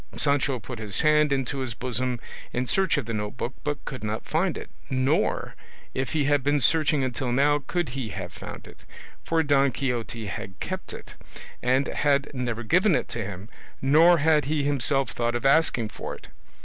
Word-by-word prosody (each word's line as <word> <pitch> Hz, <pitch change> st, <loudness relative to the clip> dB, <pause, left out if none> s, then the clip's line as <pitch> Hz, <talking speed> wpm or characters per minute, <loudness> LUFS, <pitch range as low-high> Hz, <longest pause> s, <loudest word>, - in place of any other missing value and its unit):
Sancho 140 Hz, -2 st, +1 dB
put 115 Hz, +3 st, -8 dB
his 105 Hz, -3 st, +1 dB
hand 150 Hz, -1 st, +4 dB
into 135 Hz, 0 st, -1 dB
his 130 Hz, -5 st, -3 dB
bosom 125 Hz, 0 st, -1 dB, 0.3 s
in 125 Hz, +1 st, 0 dB
search 190 Hz, +3 st, +2 dB
of 140 Hz, -, -1 dB
the 115 Hz, -, -4 dB
note 105 Hz, +2 st, -4 dB
book 125 Hz, +1 st, -3 dB
but 145 Hz, -2 st, -3 dB
could 130 Hz, -, -6 dB
not 105 Hz, +1 st, -3 dB
find 170 Hz, +2 st, 0 dB
it, -, -, -9 dB, 0.2 s
nor, 130 Hz, +3 st, +1 dB, 0.4 s
if 130 Hz, 0 st, -2 dB
he 155 Hz, -2 st, +2 dB
had 145 Hz, 0 st, +3 dB
been 145 Hz, +1 st, +2 dB
searching 145 Hz, +1 st, +3 dB
until 130 Hz, 0 st, -2 dB
now, 145 Hz, +3 st, +3 dB
could 175 Hz, -5 st, -1 dB
he 125 Hz, -3 st, -4 dB
have 90 Hz, -3 st, -6 dB
found -, -, -9 dB
it, -, -, -14 dB, 0.4 s
for 165 Hz, -1 st, +1 dB
Don 140 Hz, -2 st, +3 dB
Quixote 120 Hz, -4 st, -3 dB
had 95 Hz, -1 st, -6 dB
kept -, -, -5 dB
it, -, -, -10 dB, 0.5 s
and 130 Hz, +2 st, +2 dB
had 140 Hz, -1 st, +1 dB
never 120 Hz, -3 st, -3 dB
given 180 Hz, -, +3 dB
it -, -, -1 dB
to 115 Hz, -, -3 dB
him, 100 Hz, 0 st, -7 dB, 0.3 s
nor 160 Hz, +6 st, +6 dB
had 155 Hz, -2 st, +3 dB
he 150 Hz, 0 st, 0 dB
himself 135 Hz, -2 st, +1 dB
thought 120 Hz, 0 st, -1 dB
of 120 Hz, -, -3 dB
asking 135 Hz, -5 st, +3 dB
for -, -, -6 dB
it. -, -, -15 dB
135 Hz, 190 wpm, -26 LUFS, 120-145 Hz, 0.5 s, nor